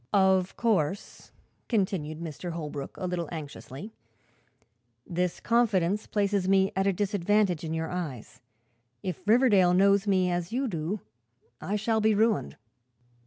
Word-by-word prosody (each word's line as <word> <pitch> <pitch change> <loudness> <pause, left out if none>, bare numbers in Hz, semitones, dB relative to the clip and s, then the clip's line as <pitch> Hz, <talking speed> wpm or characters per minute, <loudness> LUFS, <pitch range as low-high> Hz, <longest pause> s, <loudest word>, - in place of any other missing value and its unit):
"Of 190 -2 +3
course," 200 -5 -1 0.4
continued 170 -7 -1 0.2
Holbrook, 155 -5 -5
a 185 - -4
little 175 -3 -3
anxiously, 155 - -8 1.1
"this 180 0 -2
confidence 210 -4 +1
places 200 -2 0
me 195 0 +4
at 190 +1 +1
a - - +4
disadvantage 200 -2 +1
in 160 0 -3
your 160 0 -3
eyes. 155 -10 -6 0.6
If 185 -4 -4
Riverdale 210 -6 +5
knows 200 +2 +4
me 185 -2 +2
as 175 0 -2
you 260 +3 0
do 180 +1 -3 0.6
I 205 - -2
shall 220 +1 +1
be 215 0 +3
ruined." 210 - +1
190 Hz, 125 wpm, -28 LUFS, 170-205 Hz, 1.1 s, Riverdale